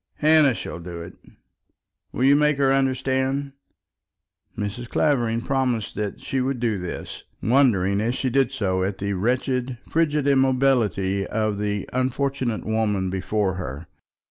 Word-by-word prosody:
Hannah 150 -4 +4
shall 85 - -6
do 85 -1 -7
it. 85 - -10 1.0
Will 125 - -2
you 140 +2 +6
make 150 -1 +3
her 135 -1 +3
understand?" 135 +1 0 1.1
Mrs. 105 +4 -4
Clavering 120 -6 +1
promised 125 -4 -1
that 105 -2 -4
she 135 - -2
would 130 0 -1
do 115 -4 0
this, 90 -1 -6 0.2
wondering, 105 -6 +3
as 120 +3 0
she 130 -2 -1
did 135 -1 +2
so, 95 -8 -1
at 95 +1 -2
the 100 +1 -2
wretched, 125 +4 -1
frigid 150 -3 +1
immobility 130 -8 +2
of 110 -2 -1
the 105 -1 -2
unfortunate 130 -2 -1
woman 105 -4 0
before 95 +1 -1
her. 75 -3 -6
120 Hz, 140 wpm, -23 LUFS, 100-135 Hz, 1.1 s, you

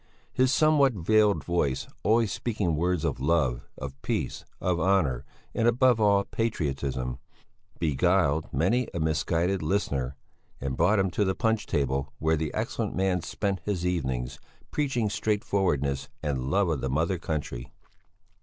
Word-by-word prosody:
His 130 0 +3
somewhat 145 -3 +4
veiled 105 +2 +3
voice, 75 -7 0
always 110 -1 +3
speaking 105 -8 -1
words 85 +1 0
of - - -1
love, 70 -4 +1
of 70 0 -7
peace, - - -2 0.2
of 90 -2 0
honour 80 -9 +2 0.3
and 115 - +2
above 120 -1 +4
all 100 -1 +5
of - - -11
patriotism, 70 - -2 0.6
beguiled 80 0 +2
many 100 - +1
a - - -1
misguided 85 +4 +1
listener, 70 -7 -1 0.4
and 65 -1 -3
brought 105 +10 +3
him 95 -2 +1
to 105 - +1
the 95 -1 0
punch 110 -2 0
table 70 0 -1
where 80 +2 +2
the 80 -1 -2
excellent - - -2
man 95 -1 +1
spent 100 +2 -2
his 95 -4 -2
evenings, 65 -9 -2 0.3
preaching 135 -7 0
straightforwardness 90 - 0
and 65 -3 -1
love 100 +5 +2
of 75 -6 -1
the 65 - -1
Mother 80 +6 0
Country. 75 -7 -4
85 Hz, 145 wpm, -27 LUFS, 70-100 Hz, 0.6 s, all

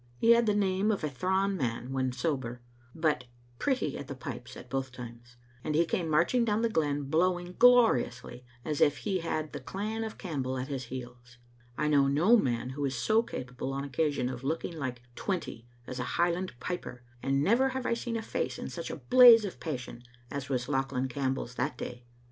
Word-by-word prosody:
He 230 - +5
had 235 -1 +5
the 210 - +3
name 195 0 +1
of 205 -6 0
a 155 - 0
thrawn 190 +8 +1
man 125 -4 -2
when 130 -1 0
sober, 125 -4 -3 0.3
but 155 -5 +1 0.3
pretty 265 -2 0
at 140 - -7
the 140 - -6
pipes 130 -4 -7
at 125 - -11
both 130 0 -3
times, 120 -1 -11 0.3
and 150 - -1
he 170 +2 +4
came 165 0 -1
marching 170 +11 +3
down 220 0 +1
the 230 - +3
glen 145 -5 0
blowing 175 +4 0
gloriously, 225 - +4 0.2
as 150 -2 -2
if 145 0 +4
he 195 -3 -1
had 155 -2 -3
the 145 - -4
clan 210 - -4
of 220 - -6
Campbell 135 -8 -3
at 130 +2 -4
his 135 -3 -3
heels. 125 0 -9 0.4
I 150 - +1
know 140 -2 +4
no 165 +12 +5
man 125 - 0
who 145 +2 -4
is 135 -1 -1
so 215 - +3
capable 125 - -5
on 140 0 -2
occasion 140 -1 0
of 125 0 -5
looking 165 +4 -2
like 130 -5 -4
twenty 165 - -4 0.2
as 125 +1 -6
a - - -1
Highland 175 +2 +1
piper, 125 -7 -5 0.2
and 135 +1 +1
never 245 - +4
have 260 -1 -4
I - - +2
seen 235 0 -3
a 220 - -4
face - - -2
in - - -5
such - - -6
a - - -4
blaze 245 -3 +8
of 195 - -6
passion 125 -6 -5 0.3
as 140 -1 -4
was 125 -3 0
Lauchlan 135 -1 -1
Campbell's 130 -2 -2
that 125 +1 -2
day. 120 +1 -7
145 Hz, 200 wpm, -30 LUFS, 125-190 Hz, 0.4 s, blaze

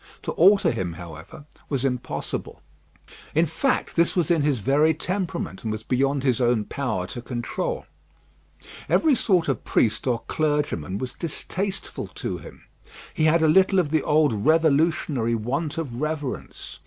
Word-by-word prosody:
To - - -2
alter 195 +4 +5
him, 95 -7 -3
however, 80 - -10 0.2
was 135 -2 -1
impossible. 125 -2 -3 0.7
In 160 +2 +4
fact, 210 - -1
this 170 0 +2
was 175 -3 +2
in 165 -3 +3
his 145 -2 +2
very 145 +8 +3
temperament, 180 - -3
and 110 - -2
was 110 0 -4
beyond 135 +3 +1
his 130 -2 +1
own 120 -3 +2
power 110 -10 -2
to 120 +6 -7
control. 125 - -3 1.0
Every 315 -3 +4
sort 185 -8 +2
of 135 -4 -1
priest 110 +3 +1
or 120 -2 0
clergyman 145 - -1
was 125 +3 -4
distasteful 190 +4 -4
to - - -4
him. - - -13 0.5
He 155 - +1
had 160 +1 +4
a - - +5
little 190 +4 +4
of 165 -6 +2
the 155 -1 +2
old 150 -2 +3
revolutionary 150 -1 +2
want 135 +8 -2
of 135 -6 -4
reverence. 155 -3 -4
145 Hz, 155 wpm, -24 LUFS, 120-165 Hz, 1.0 s, alter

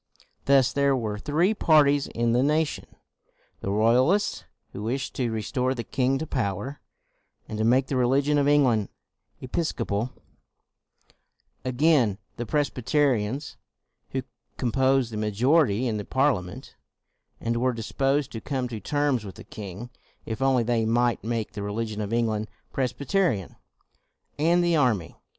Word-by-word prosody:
Thus 135 -2 +4
there 140 -1 +3
were 110 -4 -3
three 165 - +1
parties 145 -7 +4
in 115 0 0
the 120 +2 +3
nation: 150 +2 0 0.7
the - - -4
Royalists, 125 - +2 0.3
who 100 - -6
wished 125 +5 -3
to 125 -3 -1
re 110 -1 -3
store 130 +3 -1
the 120 - -4
king 130 +3 0
to 160 - -3
power, 130 - -3 0.7
and 110 - -5
to - - +1
make 125 +4 +4
the 135 - -3
religion 135 +4 +2
of 140 - +2
England 130 -8 +3 0.5
Episcopal 125 -6 -2 1.5
again; 130 -5 +2 0.2
the 120 - -4
Presbyterians, 140 -2 0 0.5
who 130 -1 -3 0.3
composed 130 0 +2
the 110 - -5
majority 120 +3 +2
in 110 -2 -1
the 105 - -4
Parliament, 130 -10 -1 0.6
and 115 0 -1
were 130 +2 +2
disposed 135 +4 -1
to 110 - -6
come 130 -3 -2
to 115 -2 -5
terms 145 +1 0
with 100 -3 -9
the - - -11
king, 105 +4 -8 0.3
if 110 +3 -5
only 135 -2 +3
they 115 -1 +1
might 120 +1 +1
make 115 -1 -2
the 105 - -6
religion 105 +1 -3
of 105 0 -4
England 110 -2 0 0.2
Pres 130 -3 0
byterian; 140 - -1 0.8
and 170 +3 +3
the 170 -1 +2
army. 115 - 0
125 Hz, 145 wpm, -26 LUFS, 110-140 Hz, 1.5 s, Thus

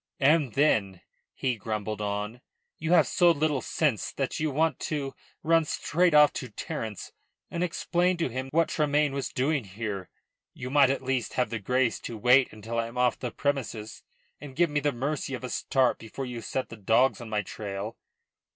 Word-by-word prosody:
"And 145 -3 +3
then," 100 - +2 0.3
he 130 -3 -1
grumbled 110 0 -3
on, 105 +3 -3 0.4
"you 160 +1 -2
have 165 -4 +6
so 175 -1 +4
little 150 -4 +1
sense 145 -10 0
that 135 -2 -2
you 155 0 +1
want 155 0 +1
to 140 -3 -3 0.3
run 165 +1 +4
straight 170 +2 +1
off 150 -1 +7
to 130 -4 -5
Terence 110 0 -5 0.4
and 170 - -1
explain 180 +1 +1
to 165 - 0
him 130 +2 -4
what 165 +4 +2
Tremayne 150 -1 +1
was 140 -2 -2
doing 140 +1 0
here. 100 -1 -5 0.5
You 130 0 -6
might 140 -2 +6
at 135 0 -1
least 130 -3 -1
have 125 -3 0
the 115 - -2
grace 125 +4 +1
to 115 - -6
wait 125 +4 +5
until 115 +2 -4
I 115 - -1
am 115 +2 -10
off 125 -1 +2
the 125 - -3
premises, 120 -6 -3 0.4
and 140 -3 -10
give 170 0 +2
me 145 - +1
the 145 0 +1
mercy 135 +2 -2
of 130 - -9
a 125 - -4
start 130 -2 +1
before 115 +4 -6
you 120 -2 -6
set 130 +3 -3
the 115 - -9
dogs 115 +6 +3
on 115 - -8
my 105 -1 0
trail." 100 +2 -5
130 Hz, 190 wpm, -28 LUFS, 115-150 Hz, 0.5 s, off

